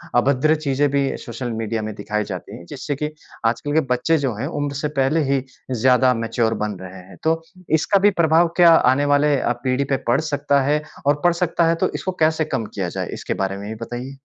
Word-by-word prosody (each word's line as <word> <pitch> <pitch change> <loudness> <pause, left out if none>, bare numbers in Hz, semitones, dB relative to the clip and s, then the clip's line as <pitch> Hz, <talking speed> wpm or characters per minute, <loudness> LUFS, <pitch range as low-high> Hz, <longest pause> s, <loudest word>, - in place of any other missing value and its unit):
अभद्र 140 +5 +3
चीज़ें 145 -2 0
भी 140 -1 0
सोशल 120 0 -6
मीडिया 110 0 -2
में 110 0 -4
दिखाई 105 +1 -2
जाती 95 -3 -7
हैं 85 - -12
जिससे 145 +2 -4
कि 150 +2 -3 0.4
आजकल 120 +6 0
के 160 - +4
बच्चे 125 +6 +2
जो 135 -5 -1
हैं, 120 +6 -3
उम्र 145 -3 -3
से 140 +2 -1
पहले 135 +4 +2
ही 135 -2 +1 0.3
ज़्यादा 125 +1 +4
मैच्योर 115 0 0
बन 105 -1 -2
रहे 95 0 -9
हैं। 90 -3 -14
तो 165 +1 +1 0.4
इसका 200 +6 +2
भी 205 +2 +5
प्रभाव 165 +1 +4
क्या 170 -2 +8
आने 135 0 +3
वाले 145 +1 +3
अ, 120 - 0
पीढ़ी 130 +1 +1
पे 135 0 0
पड़ 120 - +3
सकता 145 -2 +1
है, 145 +3 +1 0.2
और 145 +1 +2
पड़ 175 -1 +4
सकता 170 -1 +1
है 165 - +3
तो 165 - 0
इसको 185 - -2
कैसे 155 0 +2
कम 135 -7 -2
किया 95 -3 -2
जाए, - - -4
इसके - - -3
बारे 95 0 -2
में 100 +1 -7
भी 110 - -5
बताइए। 120 +3 -6
135 Hz, 225 wpm, -21 LUFS, 115-150 Hz, 0.4 s, क्या